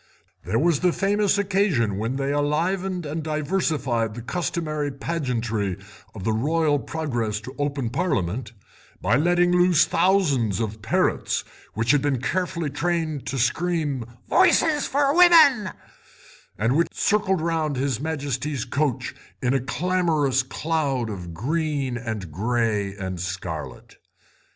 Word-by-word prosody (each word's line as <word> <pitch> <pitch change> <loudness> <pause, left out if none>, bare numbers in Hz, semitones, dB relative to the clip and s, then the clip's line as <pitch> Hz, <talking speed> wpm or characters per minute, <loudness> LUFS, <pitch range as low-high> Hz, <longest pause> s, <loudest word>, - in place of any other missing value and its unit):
There 115 - 0
was 160 +1 +2
the 180 -1 +3
famous 205 +2 +1
occasion 185 - +1
when 115 +4 -2
they 140 +1 -1
enlivened 175 +5 0
and 155 +2 -3
diversified 150 - -1
the 120 - -7
customary 155 -2 -2
pageantry 120 - -2 0.4
of 100 - -7
the 110 - +1
Royal 150 +5 +1
progress 120 -10 -2
to 130 +4 -9
open 140 -5 -1
Parliament 115 - -1 0.5
by 105 +6 +2
letting 175 +4 +3
loose 180 -2 +4
thousands 140 - +2
of 110 -1 -3
parrots, 110 - 0 0.3
which 115 +3 +2
had 145 - +3
been 140 -3 0
carefully 170 +2 -2
trained 160 -1 -2
to 135 - -2
scream 145 +1 0 0.2
'Votes 330 -5 +3
for 280 +1 +2
women,' 315 - +7 0.9
and 115 +5 +1
which 170 +2 +3
circled 205 -3 +1
round 160 -2 -1
his 130 -2 -1
Majesty's 145 -3 -3
coach 140 0 -1 0.3
in 125 +1 0
a 135 - +2
clamorous 150 -1 +1
cloud 135 -4 -2
of 90 -4 -7
green, 140 - -1
and 110 -8 -5
grey 105 +1 -1
and 95 -3 -5
scarlet. 90 -3 -6
145 Hz, 130 wpm, -24 LUFS, 115-170 Hz, 0.9 s, women